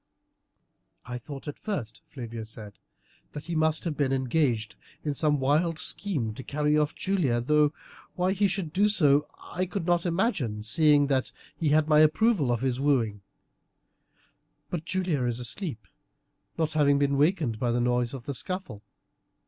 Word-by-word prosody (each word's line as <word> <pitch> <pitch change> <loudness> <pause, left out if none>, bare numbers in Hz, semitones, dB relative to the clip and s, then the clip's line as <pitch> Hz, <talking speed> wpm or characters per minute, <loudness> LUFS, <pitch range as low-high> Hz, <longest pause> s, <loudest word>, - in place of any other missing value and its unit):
"I 125 +1 -5
thought 140 +4 -9
at 145 - -6
first," 125 - -4
Flavia 115 -4 -7
said, 110 -2 -10 0.5
"that 150 - -6
he 170 - -5
must 155 -1 +1
have 165 -4 -2
been 140 -2 0
engaged 130 -4 0 0.3
in 150 - -1
some 145 0 +2
wild 155 +5 +1
scheme 150 - -1
to 130 - -8
carry 150 +2 0
off 150 0 +1
Julia, 170 -12 0
though 150 +4 +3 0.4
why 180 +1 +1
he 200 +1 +2
should 185 -5 -4
do 205 +4 +3
so 150 -7 +3
I 185 +1 -4
could 190 -2 -4
not 175 0 +1
imagine, 165 - -1
seeing 150 +4 +4
that 135 -2 0 0.2
he 160 - 0
had 155 +1 +3
my 150 -1 +5
approval 155 - +3
of 120 -1 0
his 130 -1 -1
wooing; 120 -8 +1 1.5
but 165 -2 -3
Julia 180 -7 -1
is 120 0 0
asleep, 125 - -4 0.7
not 160 -2 0
having 145 -2 +4
been 140 0 +1
a - - +1
wakened 145 - +1
by 120 - 0
the 120 +1 +1
noise 120 +1 0
of 125 -3 -9
the 140 - -3
scuffle. 185 - -5
145 Hz, 165 wpm, -27 LUFS, 125-165 Hz, 1.5 s, my